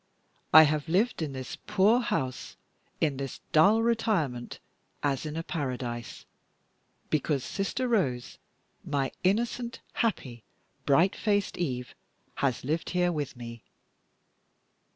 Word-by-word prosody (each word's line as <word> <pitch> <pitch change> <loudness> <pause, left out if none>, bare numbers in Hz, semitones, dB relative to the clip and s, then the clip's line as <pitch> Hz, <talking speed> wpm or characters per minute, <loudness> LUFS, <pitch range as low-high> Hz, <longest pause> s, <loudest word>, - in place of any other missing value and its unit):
I 155 +1 +11
have 150 0 0
lived 200 +4 +2
in 150 -3 -2
this 130 -1 -6
poor 210 +3 +4
house, 130 - -3 0.4
in 145 -4 +1
this 135 -2 -5
dull 205 +9 +5
retirement, 205 - 0 0.5
as 140 +1 0
in 155 +1 -5
a 165 - -2
paradise, 125 -7 -4 0.9
because 150 -3 +1
Sister 215 +6 -2
Rose 140 - 0 0.4
my 140 -2 -1
innocent, 235 +5 0
happy, 130 - -2 0.4
bright 165 +7 +4
faced 205 -2 0
Eve 125 -7 -3 0.4
has 130 -4 0
lived 155 +5 -1
here 180 -1 +2
with 145 -6 -4
me. 115 -1 -8
155 Hz, 115 wpm, -28 LUFS, 130-200 Hz, 0.9 s, I